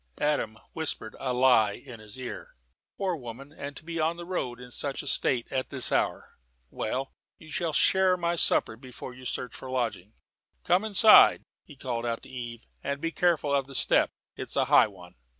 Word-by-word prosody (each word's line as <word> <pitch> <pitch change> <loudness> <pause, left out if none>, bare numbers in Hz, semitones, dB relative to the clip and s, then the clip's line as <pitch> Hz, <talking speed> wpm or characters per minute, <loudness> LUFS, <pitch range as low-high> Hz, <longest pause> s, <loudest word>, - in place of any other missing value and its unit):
Adam 145 -8 0 0.2
whispered 155 -8 -2
a 130 -2 -2
lie 125 -5 +4
in 120 0 -11
his 110 +2 -6
ear. 125 -1 -8 0.4
"Poor 190 -3 -1
woman, 135 0 -9
and 145 -2 -8
to - - -10
be 165 0 -4
on 160 +2 0
the 175 - -7
road, 130 -10 -3
in 125 0 -11
such 140 +3 -2
a - - -7
state, 125 -3 +4
at 130 -1 -2
this 130 -3 +2
hour! - - -1 0.3
Well, 130 +5 -3 0.3
you 155 -1 -14
shall 165 0 -1
share 185 +4 +3
my 170 -1 -1
supper 110 - +2
before 125 +1 -10
you 130 +1 -13
search 125 -1 -4
for 130 - -9
a - - -7
lodging. 110 -5 -3 0.5
Come 180 +4 +2
inside," 220 0 +7 0.2
he 150 - -14
called 125 -3 -4
out 115 -1 -3
to - - -13
Eve, 120 -2 -7 0.2
"and 140 +1 -3
be 165 +2 -2
careful 165 -5 +1
of 135 -1 +1
the 135 - -11
step. - - +3 0.3
It's - - -7
a - - +2
high - - +6
one." 90 -4 -14
130 Hz, 200 wpm, -27 LUFS, 120-160 Hz, 0.5 s, inside